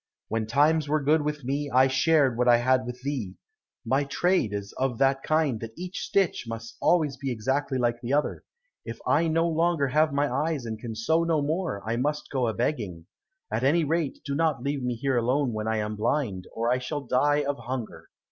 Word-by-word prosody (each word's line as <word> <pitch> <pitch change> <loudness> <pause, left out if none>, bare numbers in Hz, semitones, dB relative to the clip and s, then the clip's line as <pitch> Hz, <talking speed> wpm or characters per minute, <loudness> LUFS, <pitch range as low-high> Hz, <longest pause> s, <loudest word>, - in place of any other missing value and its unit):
When 110 -1 -1
times 150 +5 +3
were 150 -1 +1
good 155 +3 +3
with 150 -1 -3
me, 140 +3 -2
I 130 0 +5
shared 135 0 +3
what 125 +1 +1
I 120 -1 +7
had 130 +1 +2
with 125 0 -6
thee. 130 -10 -3 0.5
My 135 +2 +2
trade 175 - +1
is 100 0 -5
of 130 -3 0
that 135 +1 +2
kind 155 -7 +1
that 115 0 -7
each 180 +1 -5
stitch 195 -9 0
must 115 0 -7
always 155 -6 +2
be 135 - -4
exactly 130 +4 -1
like 120 -1 0
the 120 - -4
other. 145 +1 0 0.4
If - - -7
I 165 - +3
no 165 +1 +2
longer 165 -3 +1
have 155 +3 +3
my 140 +1 +1
eyes 145 0 -1
and 110 -1 -5
can 115 -1 -6
sew 160 +10 +1
no 165 -2 +1
more 155 - -2
I 115 +1 0
must 150 +3 -2
go 130 -3 0
a 110 - -1
begging. 105 - -2 0.5
At - - -1
any 160 +5 +3
rate 155 -1 -1
do 140 - -2
not 150 -4 0
leave 140 0 -1
me 125 -1 -1
here 130 +2 0
alone 125 +2 +1
when 110 0 -3
I 110 0 0
am 105 0 -2
blind, 105 -4 -1
or 115 +1 -1
I 125 - +2
shall 145 +3 -4
die 145 +3 +2
of 140 0 -2
hunger." 125 -2 -6
135 Hz, 215 wpm, -26 LUFS, 120-150 Hz, 0.5 s, I